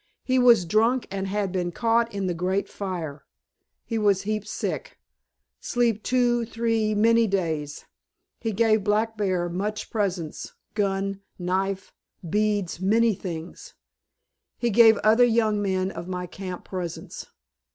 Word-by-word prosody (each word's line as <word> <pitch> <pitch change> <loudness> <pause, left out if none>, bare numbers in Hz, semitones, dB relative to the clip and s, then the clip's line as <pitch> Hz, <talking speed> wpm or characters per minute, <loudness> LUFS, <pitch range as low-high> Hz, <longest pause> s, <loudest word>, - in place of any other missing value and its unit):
He 260 0 +2
was 235 -7 +6
drunk 225 +8 +2
and 195 0 -3
had 200 -1 -1
been 175 -1 -1
caught 230 +3 +1
in 200 -1 -3
the 180 - 0
great 185 +4 -1
fire. 170 -7 -5 0.6
He 225 -2 -2
was 200 -2 +2
heap 215 0 -2
sick, - - -4 0.6
sleep 235 -3 0
two, 245 -1 +2
three, 225 -2 0
many 230 +2 +4
days. 160 -7 -2 0.5
He 225 - -2
gave 220 0 +2
Black 215 +2 +1
Bear 185 -4 0
much 205 +5 -4
presents, 185 -7 -3 0.2
gun, 195 -1 -1 0.2
knife, 190 +1 -2 0.3
beads, 205 -2 0
many 225 +4 +3
things. 175 - -7 0.8
He 240 -1 0
gave 225 0 +7
other 220 +3 +5
young 220 -3 +2
men 190 -1 0
of 170 0 -7
my 180 -1 -3
camp 185 0 -7
presents. 180 -3 -6
205 Hz, 135 wpm, -25 LUFS, 185-225 Hz, 0.8 s, gave